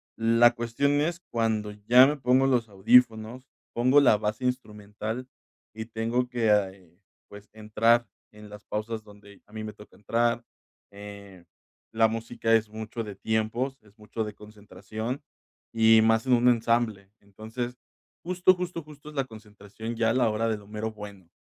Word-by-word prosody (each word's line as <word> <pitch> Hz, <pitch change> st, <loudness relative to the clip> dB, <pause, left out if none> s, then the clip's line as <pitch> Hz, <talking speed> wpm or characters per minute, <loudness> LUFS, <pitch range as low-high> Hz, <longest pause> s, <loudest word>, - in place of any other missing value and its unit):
La 115 Hz, +1 st, +4 dB
cuestión 120 Hz, +5 st, 0 dB
es 170 Hz, +2 st, -1 dB
cuando 110 Hz, -2 st, -1 dB, 0.2 s
ya 125 Hz, +2 st, +8 dB
me 150 Hz, -, 0 dB
pongo 130 Hz, 0 st, +3 dB
los 120 Hz, -4 st, +1 dB
audífonos, 110 Hz, +3 st, +3 dB, 0.3 s
pongo 130 Hz, +4 st, +5 dB
la 140 Hz, -7 st, +5 dB
base 110 Hz, +4 st, -3 dB
instrumental 110 Hz, -1 st, -4 dB, 0.5 s
y 110 Hz, 0 st, -5 dB
tengo 115 Hz, +2 st, -2 dB
que, 100 Hz, -7 st, 0 dB, 0.3 s
pues, 105 Hz, 0 st, -14 dB
entrar 110 Hz, +2 st, +2 dB, 0.2 s
en 105 Hz, 0 st, -14 dB
las 105 Hz, +1 st, -12 dB
pausas 110 Hz, +1 st, -4 dB
donde 100 Hz, -1 st, -17 dB
a -, -, -25 dB
mí 110 Hz, -, -6 dB
me 105 Hz, -, -7 dB
toca 105 Hz, 0 st, -16 dB
entrar, 115 Hz, +2 st, 0 dB, 0.5 s
eh, 100 Hz, -2 st, -11 dB, 0.5 s
la 110 Hz, 0 st, +4 dB
música 115 Hz, +1 st, -2 dB
es 110 Hz, -1 st, 0 dB
mucho 110 Hz, +2 st, -6 dB
de 105 Hz, -2 st, -8 dB
tiempos, 110 Hz, +6 st, -2 dB
es 105 Hz, 0 st, -24 dB
mucho 110 Hz, +1 st, -5 dB
de 105 Hz, -1 st, -6 dB
concentración 105 Hz, +4 st, -7 dB, 0.5 s
y 110 Hz, -1 st, +6 dB
más 115 Hz, +1 st, +2 dB
en 130 Hz, -, +4 dB
un 120 Hz, 0 st, +4 dB
ensamble. 115 Hz, -4 st, 0 dB
Entonces 110 Hz, +5 st, -7 dB, 0.5 s
justo 180 Hz, +1 st, +3 dB
justo 180 Hz, -2 st, -5 dB
justo 150 Hz, 0 st, -13 dB
es 150 Hz, -, -13 dB
la 135 Hz, -, 0 dB
concentración 110 Hz, 0 st, -9 dB
ya 115 Hz, 0 st, +1 dB
a -, -, 0 dB
la 125 Hz, -2 st, +2 dB
hora 110 Hz, +1 st, -1 dB
del 105 Hz, -2 st, -3 dB
mero 110 Hz, +1 st, -4 dB
bueno, 100 Hz, -4 st, -11 dB
110 Hz, 160 wpm, -27 LUFS, 105-120 Hz, 0.5 s, ya